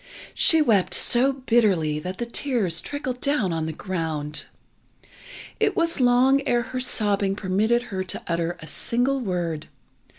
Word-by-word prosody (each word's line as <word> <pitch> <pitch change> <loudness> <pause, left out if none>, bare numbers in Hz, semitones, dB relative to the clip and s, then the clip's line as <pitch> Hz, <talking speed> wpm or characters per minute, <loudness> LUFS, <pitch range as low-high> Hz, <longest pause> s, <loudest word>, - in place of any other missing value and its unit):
She 320 -2 +5
wept 210 -9 +2
so 255 +3 +4
bitterly 215 - +1
that 185 +4 -6
the 240 - -3
tears 235 - -1
trickled 260 -3 -5
down 260 - 0
on 160 -1 -2
the - - -3
ground. 160 -4 -4 1.1
It - - +1
was 335 -2 +1
long 255 +2 +4
ere 240 0 +2
her 255 +1 -5
sobbing 205 -5 +1
permitted 215 +5 0
her 190 0 -2
to - - -4
utter 170 +1 -2
a - - -10
single 245 - -1
word. 175 - -3
210 Hz, 145 wpm, -24 LUFS, 170-250 Hz, 1.1 s, She